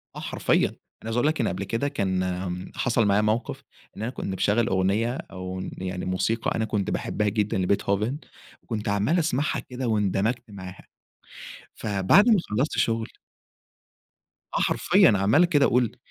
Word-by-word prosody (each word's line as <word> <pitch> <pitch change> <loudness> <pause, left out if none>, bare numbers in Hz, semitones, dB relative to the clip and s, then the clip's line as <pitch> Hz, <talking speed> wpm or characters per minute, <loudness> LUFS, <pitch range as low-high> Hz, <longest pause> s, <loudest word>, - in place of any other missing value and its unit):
آه - - -6
حرفيًا، - - +1
أنا - - -16 0.3
عايز 115 0 -3
أقول 125 +4 +2
لَك 155 +1 +1
إن - - +1
قبْل - - -3
كده 115 +5 -1
كان 95 -6 -2
حصَل 120 -2 +1
معايا 100 +1 +3
موقِف، 110 +2 -1 0.3
إن - - -6
أنا 120 +3 -2
كنت - - -6
مشغَّل 105 +4 +2
أغنية 100 +5 +1 0.2
أو 95 0 -5 0.2
يعني 90 -1 -4
موسيقى 95 +5 -1
أنا 110 - 0
كنت 105 -2 -2
باحبها 105 -1 -1
جدًا 105 -1 -1
لبيتهوفن 100 +6 0 0.5
وكنت 110 -3 -4
عَمّال 105 - +2
أسمَعها 150 -3 0
كده 125 -1 -5
واندمجت 110 +2 0
معاها، 95 -1 -10 0.9
فبعد 105 - +3
ما 220 - +6
خلّصت 125 +8 -1
شُغل 115 -1 +1 1.5
آه - - +2
حرفيًا، - - +4
عَمّال 105 - +4
كده 145 -5 +3
أقول 120 -2 +1
105 Hz, 155 wpm, -25 LUFS, 95-120 Hz, 1.5 s, ما